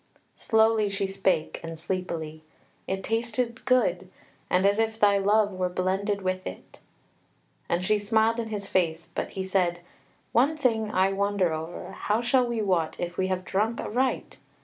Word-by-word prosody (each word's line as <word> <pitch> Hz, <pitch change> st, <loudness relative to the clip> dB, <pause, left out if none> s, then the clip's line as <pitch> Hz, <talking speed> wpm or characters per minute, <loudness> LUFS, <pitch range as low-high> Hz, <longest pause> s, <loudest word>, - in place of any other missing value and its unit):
Slowly 220 Hz, -1 st, +3 dB
she 200 Hz, 0 st, -1 dB
spake 190 Hz, -4 st, 0 dB
and 165 Hz, 0 st, -6 dB
sleepily: 165 Hz, -3 st, -4 dB, 0.5 s
"It 190 Hz, 0 st, -2 dB
tasted 235 Hz, +2 st, -1 dB
good, 195 Hz, -8 st, +2 dB, 0.4 s
and 185 Hz, +2 st, +3 dB
as 200 Hz, +2 st, +3 dB
if 225 Hz, 0 st, 0 dB
thy 200 Hz, -2 st, +5 dB
love 205 Hz, +1 st, +3 dB
were 185 Hz, -1 st, -1 dB
blended 190 Hz, +3 st, -1 dB
with 185 Hz, 0 st, -2 dB
it." -, -, -10 dB, 0.9 s
And 175 Hz, +1 st, 0 dB
she 215 Hz, +2 st, +2 dB
smiled 220 Hz, +2 st, +2 dB
in 230 Hz, -, -2 dB
his 205 Hz, -2 st, -3 dB
face; 165 Hz, -4 st, 0 dB
but -, -, -3 dB
he 190 Hz, -, -1 dB
said: 180 Hz, -2 st, 0 dB, 0.5 s
"One 280 Hz, +7 st, +3 dB
thing 225 Hz, -6 st, +1 dB
I 190 Hz, -1 st, +2 dB
wonder 200 Hz, -3 st, +1 dB
over: 160 Hz, +2 st, -6 dB
how 210 Hz, +2 st, -1 dB
shall 245 Hz, +1 st, +3 dB
we 235 Hz, -2 st, -1 dB
wot 175 Hz, -5 st, 0 dB
if 175 Hz, 0 st, -3 dB
we 185 Hz, -, 0 dB
have 185 Hz, 0 st, -2 dB
drunk 215 Hz, +4 st, 0 dB
aright? 255 Hz, +3 st, -1 dB
200 Hz, 165 wpm, -27 LUFS, 185-220 Hz, 0.9 s, thy